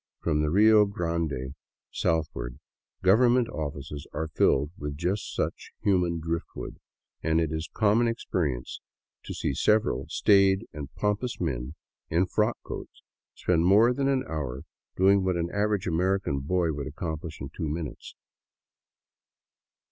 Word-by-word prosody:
From 75 -3 +1
the 75 - +1
Rio 105 +4 +6
Grande 85 - -2 0.4
southward, 75 -6 -1 0.5
government 120 +5 +5
offices 75 -1 -5
are 80 +1 -3
filled 70 -1 +2
with 75 -3 -5
just 90 +5 -2
such - - -3
human 90 -4 +2
driftwood, 85 +1 -5 0.4
and 80 0 +2
it 80 -2 0
is 80 +1 -3
common 110 +2 +3
experience 80 - -2 0.4
to - - -5
see - - -1
several 70 - +2
staid 100 +1 +4
and 70 -2 -7
pompous 105 +4 -1
men 65 -4 -3 0.3
in 85 +3 +3
frock 105 +5 +1
coats - - -8 0.3
spend 85 -2 +1
more 110 +6 +6
than 135 +2 0
an 135 -1 +2
hour 70 -5 -4 0.3
doing 95 +1 +4
what 95 -1 +1
an 85 0 -2
average 105 -1 +1
American 90 -3 0
boy 85 +3 0
would 70 0 -4
accomplish 80 +1 -5
in - - -6
two 80 - -2
minutes. 80 0 -6
85 Hz, 135 wpm, -27 LUFS, 75-100 Hz, 0.5 s, Rio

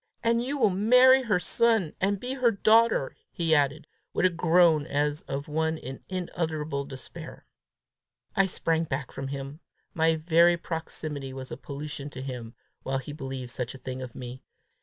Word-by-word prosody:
And 230 +1 +2
you 280 +3 -2
will 215 -7 +4
marry 250 +7 +6
her 210 -7 +1
son, 220 -1 +2
and 200 +1 +1
be 250 +4 -4
her 255 -3 +3
daughter!" 220 -6 +3 0.2
he 165 -2 +1
added, 145 0 +2 0.3
with - - +2
a 185 - +4
groan 165 -2 +4
as 145 +1 0
of 140 +3 -4
one 160 +1 0
in 135 -2 -8
unutterable 160 -5 -3
despair. 135 -1 -10 0.9
I 195 -1 +4
sprang 165 -2 0
back 135 -3 -4
from 135 - -5
him. 140 +2 -6 0.3
My 160 -1 +3
very 170 +2 +4
proximity 155 -5 -5
was 130 0 -8
a - - -3
pollution 145 0 -6
to 130 - -8
him 125 -3 -6 0.3
while 135 0 -2
he 135 +2 -6
believed 135 -4 -6
such 125 0 -4
a - - -8
thing 130 0 -6
of 125 -2 -8
me! 125 +1 -8
155 Hz, 170 wpm, -27 LUFS, 135-185 Hz, 0.9 s, marry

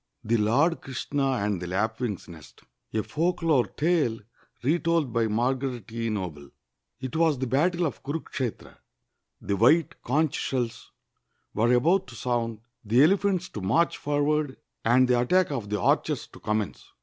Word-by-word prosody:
THE 115 +2 +2
LORD 135 +11 +2
KRISHNA 135 +2 -3 0.2
AXD 100 -2 0
THE 90 - -5
LAPWTXG'S 110 +3 -2
NEST 80 -4 -13 0.3
A 110 - +1
FOLKLORE 165 -5 +1
TALE 150 -9 +1 0.4
RETOLD 165 -2 +1
BY 115 -1 +2
M 110 0 0
ARGARET 125 -3 -2
E. 115 0 -2
NOBLE 85 -9 -4 0.5
It 130 +2 -6
was 160 -3 +3
the 130 - -2
battle 170 +7 +1
of 155 - -4
Kunikshetra. 135 -5 -5 0.6
The 100 - -1
white 160 - +3
conch 150 +3 0
sheUs 120 -3 -3 0.7
were 115 +3 +2
about 170 +10 +3
to 120 - -11
sound, 115 -3 -2 0.2
the 115 +5 +4
elephants 185 +1 +2
to 105 - -7
march 135 - +2
for 145 0 0
ward, 150 -2 0 0.3
and 125 +3 +4
the 125 -1 +3
attack 180 +7 +2
of 115 -8 -4
the 105 0 -1
archers - - +1
to - - -14
commence. 105 -1 -2
125 Hz, 155 wpm, -26 LUFS, 110-155 Hz, 0.7 s, the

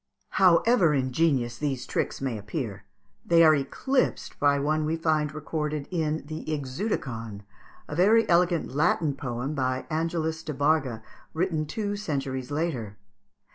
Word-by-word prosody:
However 180 -2 +5
ingenious 130 -2 +1
these 135 -4 -2
tricks - - -2
may 130 -4 -1
appear, 105 -1 -5 0.4
they 165 -1 +5
are 155 -1 +7
eclipsed 205 - -1
by 145 -1 +4
one 155 +2 0
we 155 +2 0
find 155 -2 +1
recorded 150 -1 -3
in 155 -4 -1
the 155 +1 -6
"Ixeuticon," 130 - -3 0.5
a 150 - -5
very 215 +7 +4
elegant 170 -5 +2
Latin 155 0 +2
poem, 130 +1 -4
by 130 -2 -1
Angelis 160 0 -1
de 155 -3 -5
Barga, 140 -6 +1 0.3
written 160 -3 0
two 205 +3 -2
centuries 135 -9 -3
later. 140 -10 -3
150 Hz, 135 wpm, -27 LUFS, 130-165 Hz, 0.5 s, are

